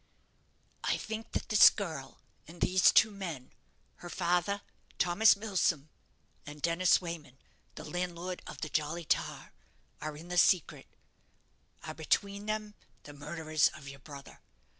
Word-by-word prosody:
"_I - - 0
think 220 +1 -6
that - - -3
this 215 - +9
girl 160 -10 -6 0.3
and 170 +2 -13
these 185 0 +5
two 220 - +5
men, 170 -10 -7 0.5
her 175 - -10
father, 180 +4 0 0.3
Thomas 180 +6 +5
Milsom, 185 -8 0 0.5
and 150 0 -10
Dennis 170 +4 +3
Wayman, 160 -7 -7 0.4
the - - -8
landlord 180 0 -4
of - - -9
the 155 - -3
'Jolly 155 +3 -2
Tar', - - -2 0.5
are 150 0 -5
in 165 +3 -11
the 180 0 +2
secret 180 -3 +2 1.0
are, 155 - -6
between 200 +6 -1
them, 215 -1 -3 0.3
the 145 - -11
murderers 155 +1 0
of 140 - -12
your 140 0 -9
brother. 140 0 -12
170 Hz, 140 wpm, -31 LUFS, 150-195 Hz, 1.0 s, this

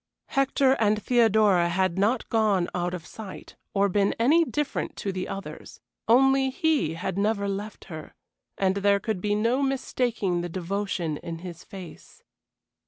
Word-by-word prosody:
Hector 275 0 +2
and 215 -1 +3
Theodora 215 -7 +3
had 185 0 0
not 220 +5 +1
gone 210 -6 +2
out 175 0 -1
of 165 -2 -9
sight, 210 0 -10 0.2
or 200 0 +4
been 200 +1 +1
any 300 +9 +4
different 295 -3 -3
to 200 - -3
the 185 -1 -4
others; 195 0 -8 0.3
only 270 +3 +4
he 270 - 0
had 190 +3 -3
never 205 -1 +1
left 200 +2 -5
her, 160 -4 -9 0.4
and 190 0 +1
there 200 0 +3
could 215 -4 -3
be 205 +1 0
no 230 +6 +1
mistaking 245 -8 -1
the 175 - -4
devotion 180 -3 -2
in 165 +1 -6
his 170 -2 -8
face. 185 -4 -12
200 Hz, 155 wpm, -26 LUFS, 185-235 Hz, 0.4 s, or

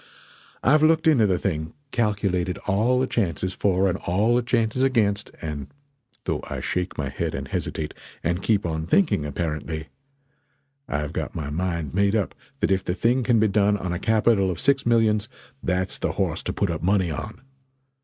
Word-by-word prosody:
I've 150 +4 +5
looked 160 +1 +4
into 135 -10 +5
the 95 -2 +2
thing 80 -4 -2 0.2
calculated 100 -6 0
all 110 +6 +2
the 130 - +2
chances 95 -6 -1
for 95 -1 +2
and 90 - -1
all 105 +7 +2
the 125 - +3
chances 115 0 0
against, 110 -6 +2
and 75 -3 -4 0.6
though - - -1
I - - -3
shake 90 0 -2
my 70 -2 -2
head - - -3
and - - -4
hesitate 75 -1 -3 0.3
and 85 +3 0
keep 105 -2 +1
on 80 -1 -2
thinking, 90 - +2
apparently, 80 0 -3 1.0
I've 75 0 -2
got - - -4
my 75 -3 -4
mind 85 -2 -2
made 100 +2 +2
up 105 -5 0 0.3
that - - +2
if 95 -1 +2
the 90 - -2
thing 120 +5 +2
can 120 -1 +3
be 110 - +4
done 105 0 +3
on 90 -2 -3
a 90 - -2
capital 110 -3 +3
of 90 - -3
six 135 -3 +2
millions, 110 -2 +3 0.3
that's 90 +2 -1
the - - -1
horse - - -1
to - - -1
put 100 -4 0
up 80 - -3
money 95 -1 +2
on! 110 +9 -6
100 Hz, 185 wpm, -24 LUFS, 85-110 Hz, 1.0 s, I've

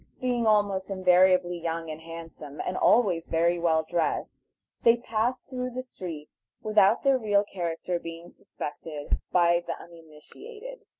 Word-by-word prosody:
Being 245 -2 0
almost 205 -3 +2
invariably 185 -1 +3
young 165 -1 -3
and 155 +1 -8
handsome, 165 -3 -10
and 180 - -2
always 185 -9 +3
very 170 +1 +1
well 160 -2 +2
dressed, 170 -1 -1 0.5
they 230 0 +5
pass 235 +2 -1
through 250 -2 -5
the 255 - -3
streets 170 -11 -9 0.2
without 215 0 +4
their 275 -2 +4
real 205 -3 +2
character 175 -2 -3
being 165 +1 -9
suspected 150 0 -5
by 170 -1 +3
the 170 - -1
uninitiated. 175 - -12
180 Hz, 135 wpm, -27 LUFS, 165-220 Hz, 0.5 s, they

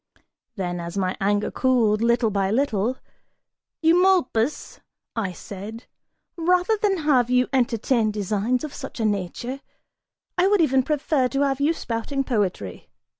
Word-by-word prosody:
Then, 175 -4 -3
as 170 +2 -6
my 185 -1 0
anger 205 +1 +1
cooled, 230 -5 +2
little 235 -1 +2
by 195 -1 0
little, 235 0 0 0.9
"Eumolpus," 330 -7 +2 0.4
I 210 -5 -1
said, 205 +5 -9 0.5
"rather 360 +5 +2
than 415 -3 +1
have 255 -5 +3
you 250 0 +3
entertain 235 -2 +1
designs 210 +5 -1
of 305 - -5
such 270 -3 -8
a 225 - 0
nature, 215 +7 -3 0.8
I 365 - +5
would 410 0 +3
even 265 -5 +4
prefer 280 -1 +1
to 275 +2 -1
have 275 -1 +1
you 295 +3 +3
spouting 275 -1 -3
poetry! 195 - -2
245 Hz, 135 wpm, -23 LUFS, 210-280 Hz, 0.9 s, I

